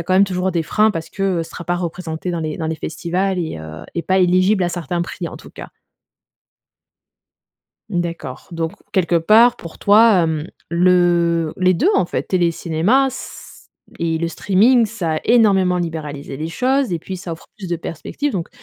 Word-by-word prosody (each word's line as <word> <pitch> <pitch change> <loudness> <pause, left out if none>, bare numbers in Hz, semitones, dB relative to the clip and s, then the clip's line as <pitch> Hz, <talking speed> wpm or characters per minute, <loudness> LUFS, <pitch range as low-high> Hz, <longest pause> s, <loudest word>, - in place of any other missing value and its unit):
a - - -2
quand 185 +2 -2
même 195 +2 +6
toujours 185 0 -1
des 165 -1 0
freins, 215 +7 +2
parce 165 -5 -5
que, 195 - -6 0.2
heu, - - 0
ce 165 - -10
sera 175 - -8
pas 175 +2 0
représenté 175 -1 -4
dans 170 -1 -2
les 155 0 -4
dans 160 - -2
les 160 - -1
festivals 180 +5 -2
et 160 - -3
heu, 80 +1 -9
et 170 - -2
pas 190 +2 +1
éligible 185 +2 +3
à 175 - +1
certains 175 0 -3
prix, 175 0 -5
en - - -9
tout - - -14
cas. - - -10 2.2
D'accord, 170 -8 -4
donc 165 0 -3 0.2
quelque 175 -2 +2
part, 225 +8 +5
pour 170 -7 -11
toi, 210 -2 +5
hem, 160 0 -2 0.2
le 170 -2 +3
les 185 0 +3
2 - - +2
en 185 - +2
fait, - - -2
télé, 175 -3 +1
cinéma 175 +12 +1
c 265 - -10 0.3
et 165 -1 0
le 170 +1 -1
streaming, 220 +7 +3
ça 175 -7 -2
a - - -2
énormément 195 -6 +4
libéralisé 150 -5 -5
les 160 +2 -3
choses 260 +7 0
et 165 - -2
puis, 185 +3 -7
ça 175 -2 -6
offre 165 - -10
plus 190 - -7
de 170 - -1
perspectives 175 - -4
donc, 175 -4 -3
175 Hz, 195 wpm, -19 LUFS, 165-190 Hz, 2.2 s, même